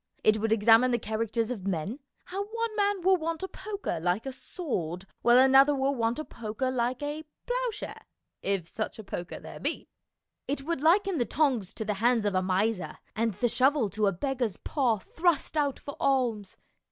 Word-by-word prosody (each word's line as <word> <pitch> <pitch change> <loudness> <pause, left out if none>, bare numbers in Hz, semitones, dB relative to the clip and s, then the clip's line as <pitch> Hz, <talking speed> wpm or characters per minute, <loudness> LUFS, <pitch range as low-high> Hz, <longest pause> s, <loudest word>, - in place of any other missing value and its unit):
It 215 0 +4
would 220 +1 0
examine 225 +3 +6
the 240 - +2
characters 225 +1 -2
of 200 -6 -5
men, 195 - -2 0.3
how 390 +2 -3
one 460 +1 -3
man 405 -3 +1
will 380 +1 +5
want 330 +1 -3
a - - -1
poker 400 - -4
like 180 +7 0
a 270 - -3
sword 190 - -4 0.2
while 240 +1 +6
another 270 +2 +6
will 270 +1 +1
want 230 -1 0
a 310 - -4
poker 230 +3 -3
like 250 +2 -1
a 295 +2 -3 0.2
ploughshare - - -3 0.3
if 195 -4 -1
such 215 +5 -4
a 220 - -8
poker 175 -2 -6
there - - -10
be. - - -3 0.6
It 275 0 -2
would 325 -2 -2
liken 360 +2 +3
the 240 - +2
tongs 245 - +1
to 220 - -3
the 210 - 0
hands 235 -2 +3
of 205 - +1
a 185 - +2
miser, 190 +2 0 0.2
and 225 -2 0
the 240 - +1
shovel 255 -2 +3
to 210 +2 +1
a - - +3
beggar's 245 +2 -2
paw 255 -7 +1
thrust 325 - 0
out 285 -3 +1
for 285 - -8
alms. 240 -7 0
250 Hz, 190 wpm, -28 LUFS, 215-300 Hz, 0.6 s, examine